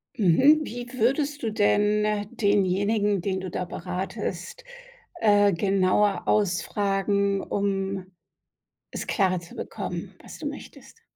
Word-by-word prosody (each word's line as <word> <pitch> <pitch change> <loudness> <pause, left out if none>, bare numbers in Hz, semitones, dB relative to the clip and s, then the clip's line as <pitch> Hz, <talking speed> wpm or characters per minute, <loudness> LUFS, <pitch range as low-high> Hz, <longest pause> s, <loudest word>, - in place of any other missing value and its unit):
Mhm. 260 - +5
Wie 245 -3 -6
würdest 275 +4 0
du 225 - -1
denn 210 0 +2
denjenigen, 205 0 +2
den 190 +1 -2
du 185 - -5
da 180 - -3
beratest, 185 - -5 0.6
äh, 205 -2 +4
genauer 195 +2 +1
ausfragen, 200 +1 +1
um 195 -1 -2 0.9
es - - -5
klarer 185 -4 +1
zu 170 - -13
bekommen, - - -6
was - - -11
du - - -4
möchtest? 460 - -10
200 Hz, 115 wpm, -25 LUFS, 190-215 Hz, 0.9 s, Mhm